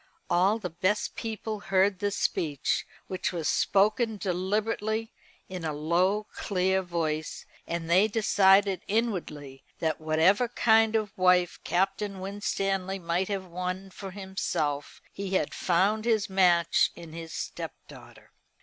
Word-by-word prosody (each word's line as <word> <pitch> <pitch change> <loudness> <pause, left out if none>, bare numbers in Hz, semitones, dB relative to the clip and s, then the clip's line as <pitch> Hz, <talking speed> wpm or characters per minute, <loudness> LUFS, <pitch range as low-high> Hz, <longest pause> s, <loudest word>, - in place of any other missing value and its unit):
All 190 +5 +3
the 180 -6 -5
best 185 +5 0
people 220 -1 -4
heard 195 -1 +2
this 205 0 -1
speech, 145 -5 -1 0.2
which 185 - -2
was 165 -4 -3
spoken 215 +3 +2
deliberately, 210 +4 -1 0.3
in 185 -2 -6
a 155 -1 -2
low 180 +8 +1
clear 190 -1 0
voice, 160 -3 -3 0.2
and 170 -1 -3
they 185 +5 +5
decided 200 -3 +4
inwardly 165 - -2
that 160 -1 -1
whatever 165 +9 +3
kind 225 -1 +3
of 215 -3 -1
wife 180 -1 +3
Captain 195 +2 -1
Winstanley 195 -1 -2
might 175 +1 -1
have 195 -2 -3
won 185 +2 -5
for 195 +1 -8
himself, 190 -7 -3
he 195 -1 -3
had - - 0
found 200 +5 +1
his 220 -3 +2
match 180 -3 +3
in 165 -2 -11
his 165 -1 -7
stepdaughter. 155 - -8
190 Hz, 130 wpm, -28 LUFS, 175-205 Hz, 0.3 s, they